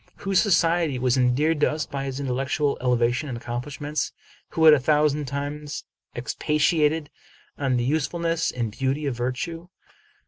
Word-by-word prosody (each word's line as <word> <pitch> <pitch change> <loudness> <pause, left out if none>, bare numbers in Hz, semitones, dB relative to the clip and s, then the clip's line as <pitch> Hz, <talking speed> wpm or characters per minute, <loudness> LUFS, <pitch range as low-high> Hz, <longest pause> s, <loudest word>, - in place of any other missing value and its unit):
whose 195 -2 +1
society 170 - +2
was 125 0 +2
endeared 135 +5 +2
to - - +3
us 155 0 -2
by 140 -1 -4
his 135 0 -4
intellectual 135 +2 0
elevation 125 +3 +1
and 120 - -4
accomplishments? 140 +5 -4 0.4
who 160 - +1
had 155 - +10
a 150 - +5
thou 150 +3 +3
sand 150 -1 -2
times 145 +2 -4 0.3
expatiated 150 0 +1 0.4
on 135 -3 0
the 120 - 0
usefulness 165 +4 0
and 120 -3 -3
beauty 135 +5 -1
of 135 -3 -1
vir 120 +2 -1
tue? 165 +6 -6
145 Hz, 160 wpm, -24 LUFS, 130-155 Hz, 0.4 s, had